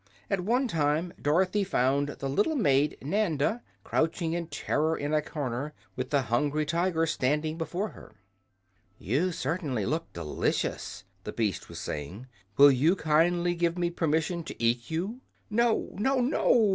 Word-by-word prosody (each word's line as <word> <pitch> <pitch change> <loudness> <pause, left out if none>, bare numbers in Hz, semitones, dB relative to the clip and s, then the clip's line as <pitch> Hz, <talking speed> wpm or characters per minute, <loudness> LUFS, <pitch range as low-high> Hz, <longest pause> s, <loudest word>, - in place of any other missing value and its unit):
At 195 - +2
one 245 +7 +1
time 160 -1 0
Dorothy 185 +7 +2
found 140 -6 +1
the 140 - -5
little 205 - +1
maid 145 - +2
Nanda 185 - 0 0.2
crouching 165 +1 0
in 170 -1 -2
terror 160 0 0
in 145 +1 -2
a 155 - +3
corner, 145 -1 -4 0.2
with - - -3
the 140 -2 +2
Hungry 145 +6 0
Tiger 170 +1 +1
standing 155 +1 0
before 175 +5 -3
her. 110 - -14 0.8
"You 145 - 0
certainly 145 - -2
look 160 +7 -2
delicious," 85 +5 -2 0.2
the 105 - -5
beast 105 -6 -2
was - - -8
saying. 80 - -5 0.3
"Will 140 0 +9
you 150 +8 +3
kindly 170 +2 +2
give 170 0 0
me 175 -1 0
permission 165 +1 0
to - - -8
eat 120 0 +1
you?" 195 +10 -3 0.3
"No, 235 +1 +2
no, 265 +6 +1
no!" 240 -3 +3
160 Hz, 150 wpm, -28 LUFS, 140-180 Hz, 0.8 s, Will